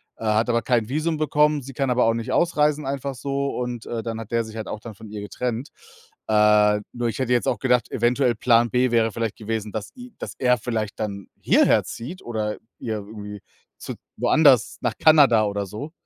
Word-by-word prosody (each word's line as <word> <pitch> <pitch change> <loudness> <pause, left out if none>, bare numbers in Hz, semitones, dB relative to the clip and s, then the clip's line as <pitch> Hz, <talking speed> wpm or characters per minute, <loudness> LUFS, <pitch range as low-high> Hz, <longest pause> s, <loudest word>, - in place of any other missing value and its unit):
äh, - - -11
hat 110 +2 +2
aber 115 -2 +1
kein 120 -2 +1
Visum 155 +3 -1
bekommen. 150 -1 +2
Sie 135 +1 -10
kann 135 0 -1
aber 125 0 +3
auch 115 0 +2
nicht 115 -1 -4
ausreisen 150 -4 +1
einfach 140 0 -3
so 140 +2 -2
und, 125 -2 -4
äh, 115 -1 -4
dann 115 0 -5
hat 115 0 -9
der 115 0 +1
sich 110 0 -10
halt 110 -1 -5
auch - - -5
dann 110 -1 -10
von 110 +2 -12
ihr 105 0 -7
getrennt. 120 +5 -4 0.6
Äh, 105 -1 +4
nur 120 -1 -2
ich 115 - -5
hätte 130 -2 -1
jetzt 120 - +1
auch - - 0
gedacht, 125 -2 +1
eventuell 120 +2 +2
Plan 120 +1 +3
B 125 0 +2
wäre 115 -1 +2
vielleicht 115 0 -3
gewesen, 110 -1 -4
dass 110 -1 -5
e 250 0 -10
dass - - -6
er 125 -1 +3
vielleicht 110 -2 -3
dann 100 -3 -4
hierher - - +4
zieht 155 +11 -8
oder 110 -2 -3 0.2
ihr 110 -2 -3
irgendwie 105 0 -8 0.4
zu - - -6 0.2
woanders 140 -7 +4
nach 120 -3 -1
Kanada 140 -9 +6
oder 100 -1 -2
so. 125 - -7
115 Hz, 210 wpm, -23 LUFS, 110-135 Hz, 0.6 s, Kanada